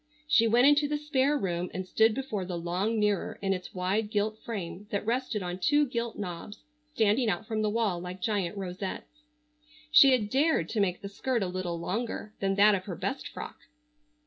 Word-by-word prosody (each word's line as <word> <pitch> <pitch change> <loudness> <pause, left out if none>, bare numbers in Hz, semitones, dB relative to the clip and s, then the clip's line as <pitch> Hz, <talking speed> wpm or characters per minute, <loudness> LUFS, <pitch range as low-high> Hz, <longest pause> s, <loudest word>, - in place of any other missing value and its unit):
She 230 -7 +5
went 240 +3 +5
into 290 +1 +5
the 295 +1 -1
spare 295 -1 +1
room 180 -6 -2
and 185 - -3
stood 220 +3 +3
before 240 -8 -3
the 180 -1 -4
long 185 +6 -1
mirror 210 -2 0
in 195 -1 0
its 185 0 -7
wide 195 +4 0
gilt 215 +1 -1
frame 200 -2 -6
that 205 -2 -2
rested 235 -3 -1
on 180 +1 -4
two 290 +10 +3
gilt 235 -3 -3
knobs 195 +1 -7 0.3
standing 220 +2 +3
out 190 +2 -2
from 220 -1 -2
the 215 - +1
wall 210 -5 0
like 180 +1 -7
giant 200 -2 -1
rosettes. 190 +9 -6 0.7
She 305 -4 +8
had 215 -5 +1
dared 275 - +2
to 220 - -2
make 185 -3 0
the - - -4
skirt 230 +3 -1
a - - -1
little 180 -1 -3
longer 215 +4 -4
than 195 0 0
that 205 +1 +6
of 185 -2 -1
her 180 - -5
best 195 - -3
frock. - - -8
210 Hz, 200 wpm, -29 LUFS, 185-235 Hz, 0.7 s, She